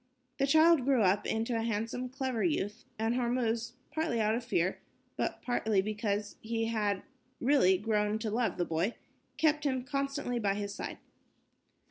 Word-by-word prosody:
The 275 - +3
child 315 0 +6
grew 260 -3 +3
up 195 +1 +2
into 225 +2 0
a 225 - 0
handsome, 230 +3 -2
clever 260 -3 -2
youth, 225 - -1
and 225 +1 +1
Hormuz, 235 -2 0 0.2
partly 315 -7 0
out 215 0 +2
of 235 +2 -1
fear, 185 -6 0 0.4
but - - -2
partly 220 -4 +1
because 210 0 -2
he 225 0 -1
had 210 -4 0 0.4
really 240 -9 +4
grown 210 +1 +1
to 220 -1 -3
love 225 -4 0
the 175 - +1
boy, 170 +8 -1 0.4
kept 300 -1 +3
him 260 -3 0
constantly 275 -1 -2
by 200 -3 +1
his 200 -1 -3
side. - - -5
230 Hz, 160 wpm, -31 LUFS, 210-255 Hz, 0.4 s, child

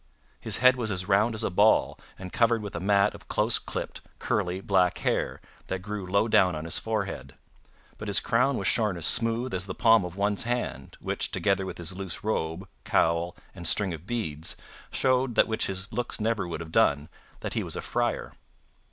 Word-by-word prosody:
His - - 0
head 125 0 +5
was 115 -3 -1
as 95 -2 -2
round 105 +3 +3
as 110 - +1
a - - -1
ball, 105 +4 +3 0.2
and 90 -1 -9
covered 115 -2 +2
with 100 - -6
a - - -2
mat 100 +2 +3
of - - -13
close - - +2
clipped, - - -6 0.2
curly 95 -3 -1
black 95 -3 +2
hair - - -1 0.3
that 95 -1 -4
grew 105 -2 -5
low 100 +4 +2
down 90 -5 +4
on 75 +1 -5
his 85 - 0
forehead. 100 -12 -4 0.6
But 105 - -6
his 100 - +4
crown 125 +3 +1
was 100 - -3
shorn 105 -4 +1
as 85 - 0
smooth 115 +5 +2
as 95 +1 -2
the 95 - -5
palm 115 -3 +5
of 90 0 -6
one's 100 +1 0
hand, 120 - -3
which, - - -2
together 100 -2 0
with 90 - -6
his 85 +1 -2
loose 95 -2 -4
robe, 95 -3 -2 0.2
cowl, 85 +1 +1 0.2
and 85 -3 -4
string 95 +1 +4
of 80 +3 -9
beads, 85 -10 -3 0.3
showed 130 -2 +1
that - - +5
which 110 - -1
his 95 +1 -5
looks 120 -1 -2
never 110 -3 0
would 85 -1 -5
have 80 -1 -8
done, 70 0 +3 0.3
that - - -4
he - - 0
was - - -5
a - - -3
friar. - - -2
100 Hz, 205 wpm, -27 LUFS, 90-110 Hz, 0.6 s, head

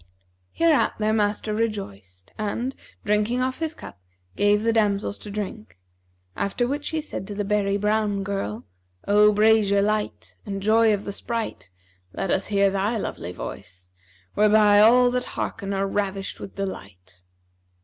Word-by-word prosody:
Hereat 330 -3 +2
their 215 0 +1
master 210 0 0
rejoiced 100 - -4
and, 230 +5 -3 0.3
drinking 210 +4 +1
off 260 0 -2
his 320 -1 -3
cup, - - -11 0.4
gave 205 +1 +3
the 230 0 +2
damsels 205 -2 0
to 210 - -10
drink, 185 - -6 0.6
after 240 +5 -1
which 285 +3 -3
he 320 - -2
said 295 -10 -7
to 205 - -6
the 205 - -1
berry 200 -1 +1
brown 210 -1 0
girl, 125 - -4 0.4
'O 210 +1 +6
brasier 210 -1 +4
light[FN#350] 210 0 -2
and 195 -1 -4
joy 220 +1 +4
of 205 -1 -1
the 200 - -3
sprite, 230 - -4 0.4
let 195 - -2
us 190 - 0
hear 200 -1 +2
thy 200 +4 0
lovely 90 - -5
voice, 90 0 -9 0.4
whereby 210 0 +5
all 245 +3 +6
that 250 0 -1
hearken 200 -2 -3
are 195 0 0
ravished 195 -1 -3
with - - -9
delight.' 95 - -7
205 Hz, 150 wpm, -24 LUFS, 195-220 Hz, 0.6 s, O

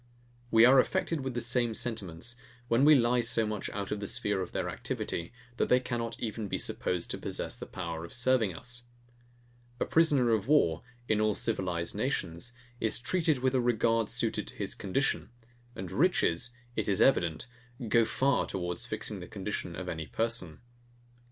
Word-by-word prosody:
We 115 0 +7
are 130 +2 +7
affected 165 +1 +1
with 130 -2 -4
the 120 - -1
same 120 -1 +1
sentiments, 110 -2 -3 0.3
when 115 +3 +3
we 150 +1 +8
lie 120 -1 +3
so 115 -1 +3
much 105 -1 -3
out 100 -1 -4
of 105 - -1
the 100 - -4
sphere 100 -1 0
of 90 - -5
their - - -2
activity, 85 0 -4 0.3
that - - +1
they 125 - +6
cannot 120 -2 -3
even 110 -1 -3
be - - -2
supposed 90 -2 -1
to - - -3
possess - - -3
the - - -8
power 85 -3 -5
of 85 - -9
serving 125 -4 +2
us. 120 +3 -5 0.9
A - - +1
prisoner 145 -7 +4
of 110 -1 +1
war, 85 - +3 0.3
in 110 -1 +2
all 110 -1 +2
civilized 90 -6 -1
nations, 85 +9 -2 0.3
is 110 - 0
treated 155 +1 0
with 130 0 +2
a 130 - +3
regard 115 -2 +2
suited 115 -1 -1
to - - -8
his - - -3
condition; 135 +8 -1 0.5
and 95 -1 -6
riches, 125 - +2 0.3
it - - 0
is 100 - +2
evident, 85 -9 +3 0.4
go 115 +2 +5
far 130 +4 +1
towards 90 -2 -3
fixing - - -3
the - - -8
condition - - -4
of - - -6
any 80 -1 -4
person. 115 -9 -2
115 Hz, 175 wpm, -30 LUFS, 95-125 Hz, 0.9 s, we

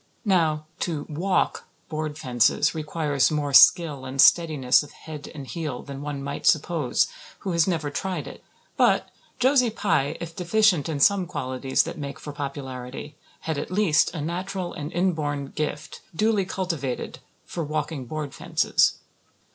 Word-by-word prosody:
Now, 160 -6 +2
to 155 -4 -2
"walk" 175 +6 0 0.2
board 155 -1 -4
fences 120 -5 +2
requires 150 -3 0
more 145 -2 -2
skill 160 -3 +6
and 130 +1 -7
steadiness 150 -6 +5
of 145 -1 -11
head 150 -1 -9
and 140 -2 -7
heel 150 -4 -5
than 140 -1 -8
one 145 -1 -4
might 140 0 -3
suppose 155 -3 +2 0.4
who 190 - -3
has 170 0 +3
never 160 -5 -1
tried 185 +5 -3
it. - - -10 0.3
But - - +3 0.3
Josie 255 -1 +4
Pye, 165 -9 0
if 165 -1 -7
deficient 180 -3 +2
in 150 -3 -2
some 190 +4 +4
qualities 130 -5 0
that 165 - -7
make 140 +1 -6
for 145 - -7
popularity, 140 -1 -6 0.3
had 160 -3 -2
at - - -5
least 185 -5 +3
a 155 - -3
natural 180 +3 -3
and 150 0 -6
inborn 150 -6 -1
gift, 150 -1 -4
duly 210 0 +2
cultivated, 165 -10 -3 0.3
for 170 - -4
walking 150 -2 -3
board 150 0 -5
fences. - - +2
155 Hz, 150 wpm, -25 LUFS, 140-175 Hz, 0.4 s, skill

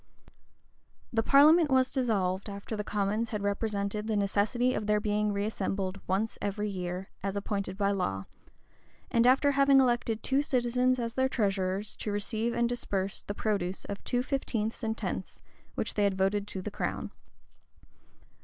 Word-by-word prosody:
The 225 - +3
parliament 300 +6 +6
was 260 -1 +3
dissolved, 200 -7 0
after 200 +2 -6
the 210 - -3
commons 210 +3 -1
had 210 -2 -3
represented 200 0 -1
the 220 - 0
necessity 210 +5 +1
of 210 - -3
their 210 0 +3
being 210 0 0
reassembled 195 -2 -2
once 200 +4 -1
every 205 +1 -2
year, 180 0 -4
as 195 0 -3
appointed 200 -2 -3
by 200 -1 +2
law; 95 - -2 0.9
and 235 +1 +4
after 270 +3 +5
having 275 0 +5
elected 240 -3 +1
two 270 +1 +2
citizens 255 -2 +1
as 230 -2 -3
their 260 +1 +1
treasurers, 195 -3 0
to 210 - -3
receive 220 +3 -1
and 235 0 +2
disburse 200 -5 -2
the 205 - -6
produce 195 -4 -2
of 200 - -6
two 245 0 0
fifteenths 235 -6 -2
and 225 -1 -2
tenths, - - -4 0.4
which - - -1
they 205 - +2
had 195 -1 +1
voted 200 +2 +1
to 190 -2 -5
the 210 - -4
crown. - - -3
210 Hz, 160 wpm, -30 LUFS, 200-240 Hz, 0.9 s, parliament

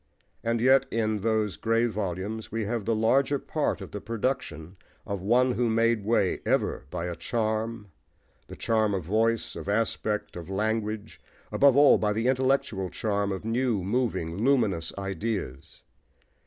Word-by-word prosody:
And 115 0 0
yet, 135 +2 +5
in 110 -1 0
those 110 -1 0
grey 115 +1 +2
volumes, 105 0 -3
we 115 0 -2
have 115 -1 -2
the 115 - +1
larger 135 +6 +2
part 150 +2 -2
of - - -8
the 105 - -6
production 100 - -3 0.3
of 100 -3 -4
one 125 +6 +3
who 120 -1 0
made 115 -1 +2
way 105 -3 +1
ever - - 0
by 85 +1 -4
a 90 -1 -3
charm, 110 -1 -2 0.6
the - - -9
charm 110 -3 +1
of 95 - -3
voice, 110 +6 0
of - - -6
aspect, 105 0 -1
of 85 0 -8
language, 110 +1 -2 0.3
above 140 -1 +5
all 145 0 +7
by 105 -1 +1
the 110 +2 -1
intellectual 130 -7 +1
charm 100 -1 -1
of 95 +2 -5
new, 115 -3 0
moving, 100 -4 -1
luminous 110 -11 +2
ideas. 95 - -4
110 Hz, 155 wpm, -27 LUFS, 100-115 Hz, 0.6 s, all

